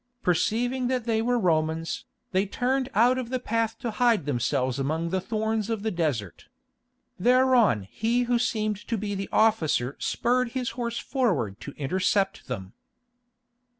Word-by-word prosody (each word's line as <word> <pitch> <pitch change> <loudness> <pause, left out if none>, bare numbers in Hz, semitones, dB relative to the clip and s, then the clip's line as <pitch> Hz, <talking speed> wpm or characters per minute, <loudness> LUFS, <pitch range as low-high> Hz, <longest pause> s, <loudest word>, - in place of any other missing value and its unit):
Perceiving 245 +8 +1
that 255 -1 0
they 225 -1 +1
were 245 +2 +1
Romans, 165 -4 0 0.3
they 190 +2 +1
turned 260 +5 0
out 245 +4 +4
of 245 -2 -5
the 255 0 -1
path 230 -2 -1
to 235 - -3
hide 225 - +2
themselves 130 -1 0
among 160 +5 -1
the 190 0 0
thorns 220 +1 -1
of 220 -3 -2
the 220 - 0
desert. 145 - -2 0.7
Thereon 245 - +4
he 230 - 0
who 240 0 +1
seemed 215 -3 0
to 230 - -1
be 205 0 -3
the 195 0 -4
officer 160 - +2
spurred 245 0 0
his 255 -2 -2
horse 235 -1 -3
forward 180 - -1
to 140 - -8
intercept 190 +6 0
them. 95 -7 -6
215 Hz, 150 wpm, -26 LUFS, 160-245 Hz, 0.7 s, out